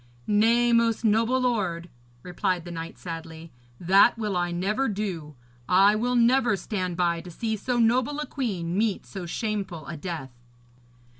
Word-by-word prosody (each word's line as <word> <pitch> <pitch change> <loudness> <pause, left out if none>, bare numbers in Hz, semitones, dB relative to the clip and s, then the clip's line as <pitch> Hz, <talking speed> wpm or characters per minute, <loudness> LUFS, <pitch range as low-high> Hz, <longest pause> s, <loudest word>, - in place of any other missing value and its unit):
'Nay, 230 +3 +3
most 230 0 +2
noble 225 +4 +3
lord,' 200 -9 -1 0.4
replied 180 -1 -2
the 175 - -7
knight 165 0 -7
sadly, 165 -1 -8 0.3
'that 195 +7 +5
will 210 -4 -2
I 175 0 0
never 205 +9 0
do. 185 -8 -4 0.3
I 195 +3 +5
will 245 +3 0
never 240 -2 +3
stand 185 -2 -3
by 170 -2 +1
to 180 - -11
see 220 +6 -3
so 245 +4 -2
noble 245 +5 +2
a 300 - -2
queen 190 - -3
meet 210 -1 0
so 190 -3 -7
shameful 195 -5 -3
a 170 - -6
death.' 155 -5 -6
200 Hz, 155 wpm, -26 LUFS, 175-230 Hz, 0.4 s, that